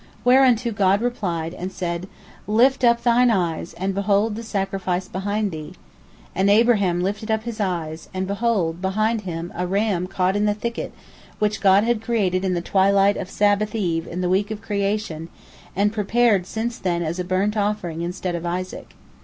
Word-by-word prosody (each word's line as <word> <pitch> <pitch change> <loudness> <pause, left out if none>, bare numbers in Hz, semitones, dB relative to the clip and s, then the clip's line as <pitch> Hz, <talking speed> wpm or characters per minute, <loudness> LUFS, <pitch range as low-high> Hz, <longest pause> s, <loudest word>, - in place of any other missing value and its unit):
Whereunto 250 -2 +4
God 200 -2 +2
replied, 180 -9 -2
and 185 +1 -5
said, 175 -1 -4 0.4
"Lift 255 +5 +3
up 235 -1 +4
thine 245 +1 +4
eyes, 175 -6 -1
and 190 +3 -2
behold 200 +2 +1
the 225 - -5
sacrifice 195 -4 -2
behind 205 +2 -2
thee." 155 +1 -7 0.6
And 190 +1 +2
Abraham 200 -5 +3
lifted 205 +3 -3
up 220 0 0
his 235 -1 -6
eyes, 165 -5 -3
and, 185 0 -2
behold, 200 -5 0
behind 215 +4 0
him 175 -3 -5
a 180 +1 -2
ram 195 -2 0
caught 185 0 0
in 205 +1 +1
the 205 -1 +1
thicket, 230 +2 -4 0.5
which 210 0 0
God 195 0 +5
had 235 -1 0
created 200 -5 0
in 185 -1 0
the 170 - -1
twilight 195 +2 +3
of 185 - -5
Sabbath 205 +2 +1
eve 170 -6 -1
in 180 +2 -4
the 180 - 0
week 195 +3 +1
of 215 -1 -4
creation, 200 -6 -2 0.5
and 205 +2 +2
prepared 215 -2 +2
since 230 +3 -3
then 175 -2 -1
as 165 +3 -3
a - - 0
burnt 190 +4 0
offering 200 -6 -1
instead 180 +1 -3
of 170 -1 -4
Isaac. 180 +2 -5
195 Hz, 180 wpm, -22 LUFS, 180-215 Hz, 0.6 s, God